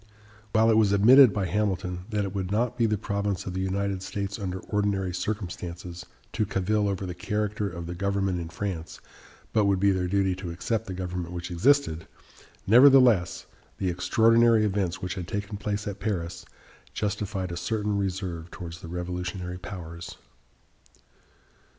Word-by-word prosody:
While 110 Hz, +1 st, +4 dB
it 110 Hz, -, +4 dB
was 105 Hz, -2 st, +4 dB
admitted 125 Hz, +5 st, +8 dB
by 100 Hz, -1 st, -1 dB
Hamilton 90 Hz, -1 st, -1 dB
that 105 Hz, -2 st, 0 dB
it 95 Hz, -, -5 dB
would 95 Hz, -2 st, -3 dB
not 115 Hz, +4 st, 0 dB
be 115 Hz, -, +2 dB
the 105 Hz, -1 st, +1 dB
province 100 Hz, -1 st, -2 dB
of 95 Hz, -, -4 dB
the 95 Hz, -, -2 dB
United 95 Hz, 0 st, -1 dB
States 100 Hz, +1 st, -4 dB
under 95 Hz, -2 st, -3 dB
ordinary 100 Hz, -3 st, -1 dB
circumstances 90 Hz, -3 st, -5 dB, 0.3 s
to 110 Hz, -, +1 dB
cavil 100 Hz, +1 st, 0 dB
over 95 Hz, -1 st, -2 dB
the 90 Hz, -, -4 dB
character 105 Hz, +2 st, -2 dB
of 85 Hz, -1 st, -7 dB
the 85 Hz, -, -5 dB
government 95 Hz, 0 st, -1 dB
in 85 Hz, -1 st, -5 dB
France, 85 Hz, -2 st, -5 dB, 0.5 s
but 110 Hz, -2 st, +3 dB
would 100 Hz, -1 st, +2 dB
be 100 Hz, +1 st, +4 dB
their 95 Hz, -1 st, 0 dB
duty 95 Hz, 0 st, +1 dB
to 90 Hz, -2 st, -6 dB
accept 95 Hz, +6 st, -2 dB
the 95 Hz, -, -5 dB
government 90 Hz, -1 st, -4 dB
which 85 Hz, +1 st, -5 dB
existed, 85 Hz, -, +2 dB, 0.6 s
nevertheless, 120 Hz, -5 st, +6 dB, 0.3 s
the 95 Hz, -, -1 dB
extraordinary 115 Hz, +5 st, +4 dB
events 95 Hz, -4 st, -1 dB
which 90 Hz, 0 st, -2 dB
had 90 Hz, -3 st, -6 dB
taken 100 Hz, +2 st, -4 dB
place 105 Hz, 0 st, -3 dB
at 100 Hz, -1 st, -5 dB
Paris 85 Hz, -6 st, -3 dB, 0.5 s
justified 100 Hz, -3 st, -2 dB
a -, -, -4 dB
certain 105 Hz, +4 st, -1 dB
reserve 95 Hz, -4 st, -3 dB
towards 85 Hz, -1 st, -8 dB
the -, -, -8 dB
revolutionary 90 Hz, +1 st, -4 dB
powers. 85 Hz, -2 st, -8 dB
95 Hz, 160 wpm, -27 LUFS, 90-105 Hz, 0.6 s, admitted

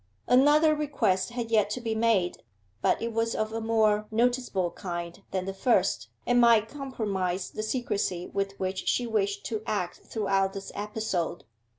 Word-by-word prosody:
Another 295 Hz, +5 st, +5 dB
request 230 Hz, -11 st, 0 dB
had 235 Hz, -1 st, -4 dB
yet 210 Hz, -2 st, +3 dB
to 215 Hz, -, -3 dB
be 230 Hz, -2 st, -2 dB
made, 220 Hz, -5 st, +1 dB, 0.4 s
but -, -, +2 dB
it 230 Hz, 0 st, -2 dB
was 230 Hz, 0 st, 0 dB
of 215 Hz, 0 st, -2 dB
a 225 Hz, -, -2 dB
more 215 Hz, -2 st, +2 dB
noticeable 230 Hz, -6 st, +1 dB
kind 175 Hz, 0 st, -6 dB
than 185 Hz, -1 st, -2 dB
the 195 Hz, -, -3 dB
first, 190 Hz, -, +1 dB, 0.2 s
and 245 Hz, 0 st, +4 dB
might 230 Hz, -2 st, +5 dB
compromise 205 Hz, -9 st, -3 dB
the -, -, -4 dB
secrecy 215 Hz, -6 st, -1 dB
with 195 Hz, 0 st, -3 dB
which 185 Hz, 0 st, -3 dB
she 245 Hz, -, +1 dB
wished 200 Hz, -3 st, -1 dB
to 220 Hz, -2 st, -2 dB
act 180 Hz, -4 st, -2 dB
throughout 195 Hz, -3 st, 0 dB
this 195 Hz, -1 st, -7 dB
episode. 205 Hz, -5 st, -3 dB
215 Hz, 165 wpm, -28 LUFS, 190-230 Hz, 0.4 s, Another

